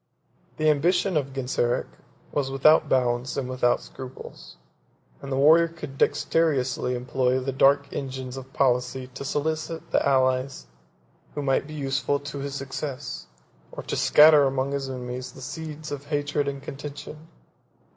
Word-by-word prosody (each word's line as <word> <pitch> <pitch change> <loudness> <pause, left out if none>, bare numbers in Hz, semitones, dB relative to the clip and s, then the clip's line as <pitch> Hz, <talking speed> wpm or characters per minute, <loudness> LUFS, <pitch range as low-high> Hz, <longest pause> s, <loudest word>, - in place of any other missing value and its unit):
The 155 - +1
ambition 175 +5 +1
of 140 -3 0
Genseric 125 -2 -1 0.5
was 140 -2 -1
without 135 +4 +4
bounds 125 0 +1
and 135 -2 -2
without 125 -1 +1
scruples; 130 -1 -11 0.6
and 140 - -7
the - - 0
warrior 160 +5 +6
could 160 -5 -9
dexterously 130 -6 +1
employ 125 +1 0
the 135 +1 -3
dark 140 +2 +4
engines 130 -2 -5
of 135 0 -9
policy 125 -1 0
to 135 - -7
solicit 160 +3 -3
the - - +2
allies 130 - +1 0.7
who 145 - -3
might 135 +1 +1
be 155 - -8
useful 140 0 -1
to 145 0 -7
his 140 0 -4
success, 135 - -5 0.4
or - - -7
to - - -3
scatter 150 -1 +7
among 135 0 0
his 140 -1 -3
enemies 125 0 -6
the - - -13
seeds 155 +2 -7
of 145 -1 -5
hatred 145 -1 -1
and 140 -1 -4
contention. 145 +2 -8
135 Hz, 145 wpm, -25 LUFS, 130-145 Hz, 0.7 s, scatter